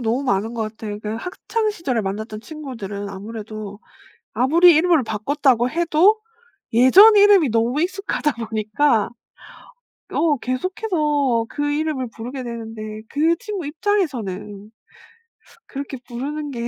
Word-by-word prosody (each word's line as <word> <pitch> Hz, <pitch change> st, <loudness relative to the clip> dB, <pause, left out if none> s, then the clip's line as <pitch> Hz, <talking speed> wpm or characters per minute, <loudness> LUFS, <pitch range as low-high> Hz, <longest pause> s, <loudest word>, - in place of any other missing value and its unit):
너무 235 Hz, +3 st, 0 dB
많은 220 Hz, 0 st, 0 dB
것 230 Hz, -, -2 dB
같아. 210 Hz, -2 st, -6 dB
그 210 Hz, +1 st, -5 dB
학창시절에 360 Hz, -, -2 dB
만났던 215 Hz, +2 st, -5 dB
친구들은 225 Hz, -9 st, -7 dB
아무래도 210 Hz, 0 st, -8 dB, 0.5 s
아무리 330 Hz, +7 st, +5 dB
이름을 320 Hz, -3 st, +3 dB
바꿨다고 245 Hz, +2 st, +1 dB
해도 345 Hz, +6 st, +3 dB, 0.5 s
예전 360 Hz, -, +7 dB
이름이 400 Hz, -8 st, +6 dB
너무 230 Hz, +5 st, +1 dB
익숙하다 370 Hz, -4 st, -1 dB
보니까 220 Hz, +2 st, +1 dB, 1.0 s
어 305 Hz, -4 st, +2 dB
계속해서 290 Hz, -, 0 dB
그 290 Hz, 0 st, -2 dB
이름을 295 Hz, -3 st, -1 dB
부르게 250 Hz, +3 st, -6 dB
되는데 225 Hz, -2 st, -7 dB, 0.3 s
그 320 Hz, +4 st, +2 dB
친구 400 Hz, -7 st, -5 dB
입장에서는 240 Hz, -, -2 dB, 1.0 s
그렇게 275 Hz, 0 st, -6 dB
부르는 285 Hz, +4 st, -5 dB
게 235 Hz, -2 st, -4 dB
260 Hz, 290 characters per minute, -21 LUFS, 220-315 Hz, 1.0 s, 예전